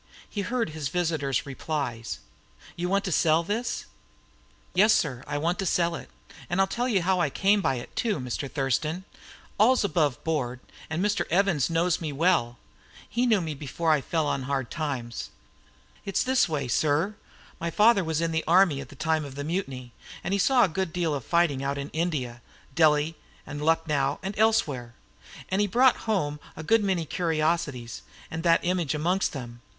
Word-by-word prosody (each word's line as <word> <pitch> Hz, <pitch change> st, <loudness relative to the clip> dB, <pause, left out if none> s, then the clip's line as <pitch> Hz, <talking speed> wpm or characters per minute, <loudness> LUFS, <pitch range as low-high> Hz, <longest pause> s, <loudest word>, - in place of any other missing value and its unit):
He 205 Hz, -, -4 dB
heard 230 Hz, -3 st, -1 dB
his 150 Hz, -3 st, -3 dB
visitor's 160 Hz, -6 st, 0 dB
replies. 135 Hz, -5 st, -3 dB, 0.6 s
"You 175 Hz, +1 st, -2 dB
want 200 Hz, +1 st, +2 dB
to 185 Hz, -, -2 dB
sell 160 Hz, 0 st, +3 dB
this?" 220 Hz, +6 st, -2 dB, 0.9 s
"Yes, 215 Hz, +4 st, +5 dB
sir, 135 Hz, -, 0 dB
I 145 Hz, -, -2 dB
want 170 Hz, +4 st, 0 dB
to 195 Hz, -, -1 dB
sell 170 Hz, -1 st, +2 dB
it. 155 Hz, -, -7 dB, 0.4 s
I'll 195 Hz, +2 st, +3 dB
tell 240 Hz, +6 st, -2 dB
you 200 Hz, -8 st, +1 dB
how 185 Hz, +1 st, +2 dB
I 165 Hz, -, +2 dB
came 200 Hz, +7 st, +2 dB
by 135 Hz, -, +1 dB
it, 120 Hz, -, -8 dB
too, 220 Hz, -, 0 dB
Mr. 125 Hz, +2 st, -4 dB
Thurston. 150 Hz, +5 st, -1 dB, 0.6 s
All's 245 Hz, +4 st, +5 dB
above 155 Hz, -10 st, +1 dB
board; 130 Hz, -6 st, -1 dB, 0.3 s
and 165 Hz, +5 st, -1 dB
Mr. 210 Hz, 0 st, 0 dB
Evanson, 170 Hz, -4 st, +2 dB
he -, -, +4 dB
knows 175 Hz, 0 st, +2 dB
me 155 Hz, -2 st, -3 dB
well, 140 Hz, -6 st, +2 dB, 0.6 s
and 245 Hz, +1 st, +2 dB
knew 215 Hz, -4 st, +4 dB
me 160 Hz, -2 st, -3 dB
before 150 Hz, +3 st, -1 dB
I 150 Hz, -2 st, +3 dB
fell 160 Hz, +3 st, -1 dB
on 140 Hz, -, -1 dB
hard 135 Hz, -4 st, -1 dB
times. 135 Hz, -8 st, -4 dB, 0.7 s
It 195 Hz, -, -6 dB
was -, -, +3 dB
this 260 Hz, -6 st, +2 dB
way, 145 Hz, -4 st, -2 dB
sir: 150 Hz, -, +1 dB, 0.5 s
My 170 Hz, -, -2 dB
father 210 Hz, +3 st, +4 dB
was 160 Hz, -1 st, -1 dB
in 165 Hz, 0 st, 0 dB
the 160 Hz, 0 st, 0 dB
army 170 Hz, -4 st, +4 dB
at -, -, -10 dB
the -, -, -12 dB
time 160 Hz, +2 st, 0 dB
of 140 Hz, -2 st, -8 dB
the 145 Hz, -, -4 dB
Mutiny, 140 Hz, -7 st, -4 dB, 0.3 s
and 190 Hz, -, -2 dB
he 200 Hz, -, +1 dB
saw 255 Hz, +5 st, +5 dB
a -, -, +4 dB
good 185 Hz, 0 st, -2 dB
deal 170 Hz, -2 st, 0 dB
of 140 Hz, -3 st, -3 dB
fighting 170 Hz, -5 st, +2 dB
out 140 Hz, +1 st, -1 dB
in 140 Hz, +1 st, -4 dB
India 145 Hz, -8 st, -2 dB, 0.3 s
Delhi 155 Hz, +1 st, +3 dB, 0.3 s
and 145 Hz, 0 st, -6 dB
Lucknow 150 Hz, -3 st, +1 dB
and 195 Hz, +1 st, -3 dB
elsewhere 140 Hz, -, +1 dB, 0.5 s
and 190 Hz, +2 st, +1 dB
he 205 Hz, -, +2 dB
brought 250 Hz, +5 st, +5 dB
home 150 Hz, -8 st, 0 dB, 0.2 s
a 160 Hz, -, -7 dB
good 225 Hz, +5 st, +3 dB
many 185 Hz, -4 st, 0 dB
curiosities, 155 Hz, -7 st, -1 dB, 0.3 s
and 160 Hz, -, -3 dB
that 165 Hz, 0 st, +3 dB
image 175 Hz, -4 st, 0 dB
amongst 180 Hz, +5 st, 0 dB
them. 120 Hz, -4 st, -7 dB
160 Hz, 185 wpm, -27 LUFS, 140-185 Hz, 0.9 s, Yes